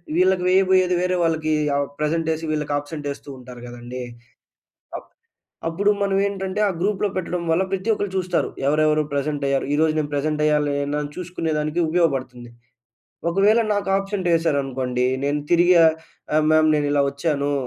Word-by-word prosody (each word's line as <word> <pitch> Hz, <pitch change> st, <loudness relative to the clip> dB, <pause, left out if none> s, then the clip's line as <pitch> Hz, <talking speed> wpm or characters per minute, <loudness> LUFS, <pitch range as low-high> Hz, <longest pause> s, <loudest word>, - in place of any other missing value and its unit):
వీళ్ళకి 185 Hz, +1 st, +3 dB
వేయబోయేది 185 Hz, -1 st, +3 dB
వేరే 180 Hz, 0 st, 0 dB
వాళ్ళకి 160 Hz, -1 st, 0 dB, 0.2 s
ఆహ్, 140 Hz, -1 st, 0 dB
ప్రెజెంటేసి 160 Hz, +1 st, -1 dB
వీళ్ళకి 150 Hz, -1 st, -2 dB
అబ్సెంట్ 145 Hz, 0 st, -8 dB
యేస్తూ 140 Hz, 0 st, -8 dB
ఉంటారు 125 Hz, -1 st, -11 dB
గదండీ! 120 Hz, +1 st, -8 dB, 1.0 s
అప్ -, -, -12 dB, 0.6 s
అప్పుడు 200 Hz, +5 st, +1 dB
మనమేంటంటే 195 Hz, 0 st, -1 dB
ఆ -, -, 0 dB
గ్రూప్‌లో 205 Hz, +1 st, 0 dB
పెట్టడం 180 Hz, -1 st, -2 dB
వల్ల 175 Hz, +4 st, +2 dB
ప్రతి 195 Hz, +4 st, 0 dB
ఒక్కళ్ళు 205 Hz, -2 st, -4 dB
చూస్తారు. 185 Hz, -1 st, 0 dB, 0.2 s
ఎవరెవరు 155 Hz, +1 st, +2 dB
ప్రెజెంట్ 145 Hz, 0 st, -2 dB
అయ్యారు. 135 Hz, -1 st, 0 dB
ఈరోజు 155 Hz, +1 st, +2 dB
నేను 145 Hz, -1 st, -2 dB
ప్రెజెంట్ 150 Hz, +1 st, -1 dB
అయ్యాలి 150 Hz, -1 st, +1 dB
అని 145 Hz, +1 st, -3 dB
చూసుకునే 175 Hz, -2 st, -3 dB
దానికి 155 Hz, +3 st, -1 dB
ఉపయోగపడుతుంది. 130 Hz, -8 st, -1 dB, 0.8 s
ఒకవేళ 200 Hz, +6 st, +3 dB
నాకు 200 Hz, -1 st, -2 dB
ఆబ్సెంటేశారనుకోండి 145 Hz, -10 st, 0 dB, 0.2 s
నేను 145 Hz, +1 st, 0 dB
తిరిగి 175 Hz, +1 st, +5 dB
ఆహ్, 160 Hz, -1 st, +5 dB, 0.4 s
ఆహ్, 155 Hz, 0 st, +3 dB
మ్యామ్ 155 Hz, 0 st, +4 dB
నేను 145 Hz, -1 st, 0 dB
ఇలా 145 Hz, -, +3 dB
వచ్చానూ! 145 Hz, 0 st, -1 dB
155 Hz, 145 wpm, -22 LUFS, 145-185 Hz, 1.0 s, తిరిగి